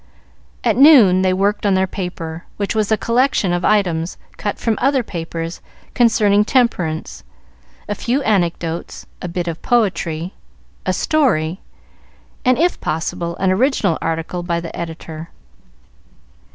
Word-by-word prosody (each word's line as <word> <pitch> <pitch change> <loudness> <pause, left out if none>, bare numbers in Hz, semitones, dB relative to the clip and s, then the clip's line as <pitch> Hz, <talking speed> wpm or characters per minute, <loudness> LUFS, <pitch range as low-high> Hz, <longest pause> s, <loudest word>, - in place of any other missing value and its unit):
At - - +2
noon 245 -11 +7
they 185 0 +2
worked 200 +3 0
on 200 -2 +3
their 190 0 +2
paper, 175 -3 -6
which 200 -1 -1
was 215 -1 0
a 220 - +4
collection 235 -6 +1
of 175 0 -1
items, 175 -5 +1 0.2
cut 205 -1 -3
from 225 -2 -1
other 265 0 +2
papers, 165 -3 -5 0.3
concerning 215 -4 +4
temperance, 200 -10 0 0.6
a 205 - -1
few 245 +7 -1
anecdotes, 170 -5 -1 0.2
a - - -4
bit 175 0 -3
of 165 -1 -4
poetry, 185 -7 0 0.5
a - - +3
story, 190 - +1 0.8
and, 255 0 +3
if 350 +3 +1
possible, 170 +1 -3
an 190 0 +1
original 205 - +1
article 165 +2 -2
by 170 -1 -1
the 170 -1 -7
editor. 165 -1 -7
185 Hz, 135 wpm, -19 LUFS, 170-220 Hz, 0.8 s, noon